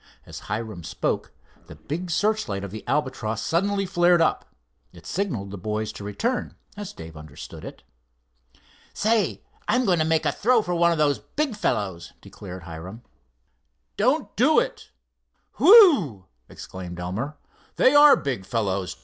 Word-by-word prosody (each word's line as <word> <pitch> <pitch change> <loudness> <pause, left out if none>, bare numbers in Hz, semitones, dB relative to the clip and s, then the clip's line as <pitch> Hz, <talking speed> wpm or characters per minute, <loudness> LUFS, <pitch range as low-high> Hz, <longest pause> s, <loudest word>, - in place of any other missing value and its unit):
As - - -9
Hiram 105 -4 -4
spoke, - - -3 0.4
the - - -11
big 175 +5 -5
searchlight 205 - 0
of 100 - -6
the 110 +1 -8
Albatross 130 -7 -1
suddenly 195 - 0
flared 175 -2 +3
up. 165 - 0 0.4
It - - -15
signalled 140 - -3
the 100 - -7
boys 105 +2 -3
to - - -10
return, 225 - -2 0.2
as 205 -2 -7
Dave 80 0 -11
understood 75 -2 -10
it. - - -10 1.1
"Say, 220 +1 +1 0.2
I'm 250 0 +2
going 180 -5 +2
to - - +3
make 160 0 +1
a - - +2
throw 235 0 +2
for 180 - -3
one 170 0 +3
of 165 - 0
those 145 -2 +2
big 290 -6 -3
fellows," 95 - -2
declared 95 -3 -10
Hiram. 85 +7 -9 0.9
"Don't - - 0
do - - +4
it. - - -1 0.7
Whew!" 280 - +6 0.2
exclaimed 90 -2 -9
Elmer. 110 +12 -4 0.4
"They 260 - +4
are 290 0 +8
big 130 -8 -3
fellows. 95 -4 -2
140 Hz, 150 wpm, -24 LUFS, -, 1.1 s, are